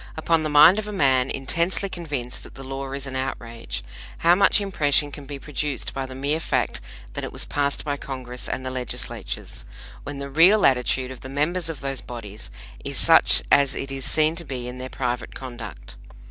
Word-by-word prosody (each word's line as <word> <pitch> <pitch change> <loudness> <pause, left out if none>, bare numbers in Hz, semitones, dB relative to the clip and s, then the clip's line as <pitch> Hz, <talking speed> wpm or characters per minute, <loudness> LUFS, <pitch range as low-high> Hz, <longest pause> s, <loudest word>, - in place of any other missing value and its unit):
Upon 160 0 +2
the 155 - -1
mind 155 +7 +8
of 215 - -4
a - - -4
man 135 -8 +3
intensely 170 +8 0
convinced 145 -10 -4
that - - -13
the 135 - -8
law 135 0 -5
is 140 0 -4
an 130 -1 -6
outrage, 120 -3 -4 0.4
how 170 - +8
much 195 +3 +5
impression 145 -7 +1
can 140 0 -9
be 145 0 -5
produced 145 0 -3
by 135 -1 -3
the 130 - -9
mere 140 +4 0
fact - - -1 0.3
that - - -4
it - - -4
was - - -2
passed 140 +1 -1
by 145 -1 -1
Congress 125 -3 -6
and 130 - -3
the 130 - -3
Legislatures, 125 - -4 0.4
when 145 0 -6
the 140 0 -5
real 185 +8 +6
attitude 130 0 +2
of 130 - -9
the 130 - -9
members 165 +5 0
of 160 - -6
those 135 -2 -2
bodies 110 - -8 0.3
is - - -4
such - - +6
as 140 -1 +5
it 135 - -3
is 135 -1 -5
seen 155 +3 +3
to 170 - -4
be 130 -5 -5
in 125 +1 -7
their 130 0 -5
private 125 -3 -3
conduct? 115 - -8
135 Hz, 200 wpm, -24 LUFS, 130-155 Hz, 0.4 s, mind